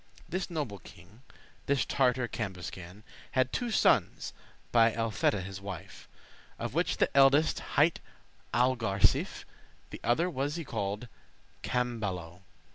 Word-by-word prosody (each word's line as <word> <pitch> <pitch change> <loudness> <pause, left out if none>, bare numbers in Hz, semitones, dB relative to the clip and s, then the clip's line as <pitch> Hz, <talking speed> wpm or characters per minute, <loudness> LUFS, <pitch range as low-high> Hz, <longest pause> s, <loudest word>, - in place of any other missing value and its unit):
This 185 +2 -3
noble 145 - -3
king, 90 +9 -16 0.5
this 140 -3 +2
Tartar 125 -2 +2
Cambuscan, 95 -2 -6 0.3
Hadde 130 -1 +2
two 245 - -1
sons 220 - +2 0.4
by 115 -1 +5
Elfeta 110 -3 +1
his 95 +1 -7
wife, 100 -4 -8 0.5
Of - - -4
which - - +1
the - - +1
eldest 140 +3 +5 0.2
highte 155 +3 +4 0.5
Algarsife, 120 -5 +2 0.5
The - - -7
other 155 +9 +2
was 145 -1 -2
y 165 - -3
called 105 -2 -3 0.5
Camballo. 100 -9 -2
120 Hz, 120 wpm, -30 LUFS, 100-135 Hz, 0.5 s, by